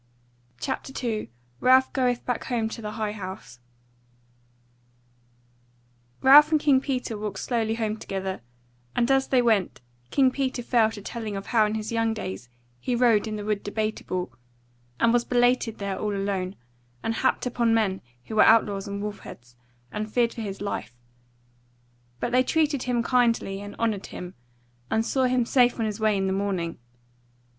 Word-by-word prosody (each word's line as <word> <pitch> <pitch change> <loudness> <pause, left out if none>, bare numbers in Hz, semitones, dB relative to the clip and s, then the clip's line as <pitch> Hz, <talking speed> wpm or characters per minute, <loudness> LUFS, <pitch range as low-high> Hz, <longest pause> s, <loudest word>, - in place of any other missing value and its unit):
CHAPTER 270 - -4
2 230 - -2 0.3
Ralph 260 - +4
Goeth 250 -2 0
Back 245 -2 -2
Home 235 -3 -1
to 230 - -7
the 210 -1 -5
High 215 -2 -2
House 185 - -8 2.6
Ralph 290 +3 +9
and 310 - +4
King 280 -3 +4
Peter 255 -5 -2
walked 210 -2 -4
slowly 225 -1 -1
home 220 -1 -2
together, 190 - -4 0.5
and 245 +2 +2
as 270 0 +3
they 255 -2 +3
went 220 -6 +1 0.3
King 265 -2 +3
Peter 260 -2 -2
fell 230 -2 +3
to 210 -2 -9
telling 220 -2 -5
of 195 0 -5
how 220 -3 +3
in 210 - -2
his 220 +1 -4
young 225 -1 +1
days 120 - -6 0.3
he 245 - -1
rode 235 -3 +3
in 215 - -3
the 205 -1 -5
Wood 210 -1 -1
Debateable, 205 - -3 0.7
and 230 - +4
was 240 -1 +3
belated 245 -2 +2
there 200 -1 -3
all 210 -1 -2
alone, 195 -1 -2 0.5
and 225 - 0
happed 260 +3 0
upon 240 -2 +1
men 215 -4 +1 0.2
who 220 - -7
were - - +7
outlaws 205 -3 +4
and 200 0 -4
wolfheads, 120 -12 -8 0.4
and 215 0 -4
feared 235 0 +2
for 235 - -6
his 200 -2 -5
life; 200 - -4 1.2
but 240 - -2
they 250 +1 +4
treated 295 0 +1
him 245 -2 0
kindly, 230 -6 +1
and 205 0 -8
honoured 220 -4 -1
him, 180 0 -8 0.6
and 225 0 +1
saw 260 +2 +1
him 250 -1 +2
safe 245 0 +3
on 225 - +1
his 210 0 -3
way 215 -2 +2
in 195 - 0
the 190 - 0
morning. 190 -4 -2
220 Hz, 165 wpm, -26 LUFS, 200-245 Hz, 2.6 s, Ralph